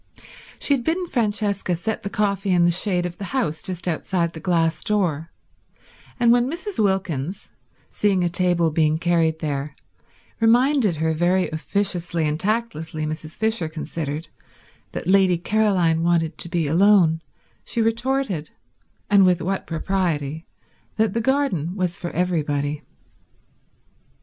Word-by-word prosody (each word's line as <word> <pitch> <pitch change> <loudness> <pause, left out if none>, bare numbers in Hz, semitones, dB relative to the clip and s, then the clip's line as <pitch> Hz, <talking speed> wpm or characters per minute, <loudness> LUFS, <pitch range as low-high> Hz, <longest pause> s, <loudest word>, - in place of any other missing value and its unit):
She 285 - +1
had 260 -4 0
bidden 340 +6 0
Francesca 205 - -1
set 205 +6 -3
the 200 - -4
coffee 200 -1 -1
in 175 -2 +4
the 175 - +4
shade 180 0 +2
of 175 -1 -6
the 200 - -4
house 160 - -1
just 185 -1 -4
outside 170 0 -1
the 160 - -8
glass 165 -1 0
door, 170 -7 0 0.9
and 235 -1 +5
when 245 +1 +3
Mrs. 360 - -2
Wilkins, 190 -4 -2 0.4
seeing 195 -3 +1
a - - +2
table 175 -1 +2
being 155 0 +2
carried 165 -1 +1
there, 145 -1 -3 0.6
reminded 240 - +3
her, 160 +1 0
very 175 +3 +1
officiously 175 -1 -1
and 150 +1 -2
tactlessly 190 -7 -2
Mrs. 155 0 -6
Fisher 220 -7 -1
considered, 155 -1 -5 0.6
that - - -5
Lady 190 -1 +4
Caroline 180 -4 +2
wanted 170 -1 +1
to 170 - -3
be 170 -2 0
alone, 170 0 +4 0.4
she - - -3
retorted—and 220 - -1
with 180 -2 +4
what 190 +2 -3
propriety—that 165 +4 -3
the 230 - 0
garden 220 - 0
was 180 -3 -1
for 175 - -5
everybody. 150 -5 -1
180 Hz, 135 wpm, -22 LUFS, 160-205 Hz, 0.9 s, and